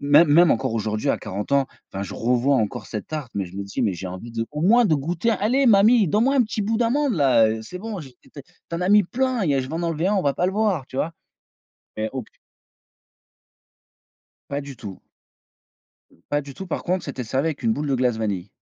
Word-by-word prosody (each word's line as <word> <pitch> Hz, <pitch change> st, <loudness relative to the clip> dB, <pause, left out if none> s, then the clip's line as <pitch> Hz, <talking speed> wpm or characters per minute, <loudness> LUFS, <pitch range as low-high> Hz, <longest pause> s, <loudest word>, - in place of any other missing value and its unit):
même 145 Hz, +4 st, +6 dB
même 165 Hz, +3 st, +6 dB
encore 115 Hz, 0 st, 0 dB
aujourd'hui 110 Hz, -1 st, -2 dB
à -, -, +2 dB
40 100 Hz, +7 st, -5 dB
ans, 140 Hz, -1 st, +3 dB, 0.3 s
enfin, 95 Hz, -, -4 dB
je 100 Hz, -, -6 dB
revois 125 Hz, +4 st, +2 dB
encore 105 Hz, -4 st, -2 dB
cette 105 Hz, -, -6 dB
tarte, 150 Hz, -5 st, -5 dB
mais, 100 Hz, -, 0 dB
je 90 Hz, +2 st, -12 dB
me 100 Hz, -, -3 dB
dis: 100 Hz, -, -5 dB
«Mais 100 Hz, -, +1 dB
j'ai 90 Hz, +1 st, -6 dB
envie 95 Hz, +6 st, -8 dB
de 115 Hz, 0 st, -2 dB
au 150 Hz, 0 st, -5 dB
moins 235 Hz, +7 st, +5 dB
de 165 Hz, -, +3 dB
goûter, 170 Hz, +10 st, -1 dB
allez 240 Hz, +6 st, +2 dB
mamie, 215 Hz, -1 st, +5 dB
donne-moi 235 Hz, -, +2 dB
un 260 Hz, -, +5 dB
petit 220 Hz, -1 st, -3 dB
bout 220 Hz, +2 st, 0 dB
d'amande 250 Hz, +3 st, +1 dB
là, 130 Hz, -8 st, +4 dB
heu, 110 Hz, 0 st, -3 dB
c'est 180 Hz, +11 st, -8 dB
bon, 215 Hz, -2 st, -5 dB
j'ai 135 Hz, -5 st, -11 dB
tu -, -, -22 dB, 0.5 s
en 170 Hz, -, -3 dB
as 180 Hz, -, 0 dB
mis 205 Hz, -1 st, +6 dB
plein, 250 Hz, +1 st, -1 dB
il 155 Hz, -, +1 dB
y 140 Hz, -, +3 dB
a 135 Hz, -, +2 dB
je 130 Hz, -, -6 dB
vais 160 Hz, -, -5 dB
en 170 Hz, -, -2 dB
enlever 165 Hz, +2 st, 0 dB
1, 205 Hz, -, +2 dB
on 190 Hz, -, +1 dB
va 140 Hz, -3 st, +1 dB
pas 180 Hz, -, +1 dB
le 190 Hz, -, -1 dB
voir». 200 Hz, -9 st, 0 dB
Tu 130 Hz, -, -9 dB
vois? 165 Hz, +4 st, -1 dB, 0.9 s
Et 110 Hz, 0 st, -1 dB
au 130 Hz, -, -3 dB
plus -, -, -16 dB, 2.2 s
Pas 140 Hz, +1 st, -2 dB
du 140 Hz, -1 st, -9 dB
tout 100 Hz, -5 st, -9 dB, 1.3 s
pas 145 Hz, 0 st, +1 dB
du 140 Hz, -1 st, -10 dB
tout 190 Hz, +8 st, -8 dB
par -, -, -3 dB
contre, 180 Hz, 0 st, -1 dB
c'était 135 Hz, -3 st, -5 dB
servi 135 Hz, +7 st, -1 dB
avec 155 Hz, -3 st, -4 dB
une 225 Hz, -, +3 dB
boule 150 Hz, -8 st, -2 dB
de 135 Hz, -, +1 dB
glace 125 Hz, -2 st, +1 dB
vanille. 100 Hz, -4 st, -3 dB
145 Hz, 245 wpm, -23 LUFS, -, 2.2 s, même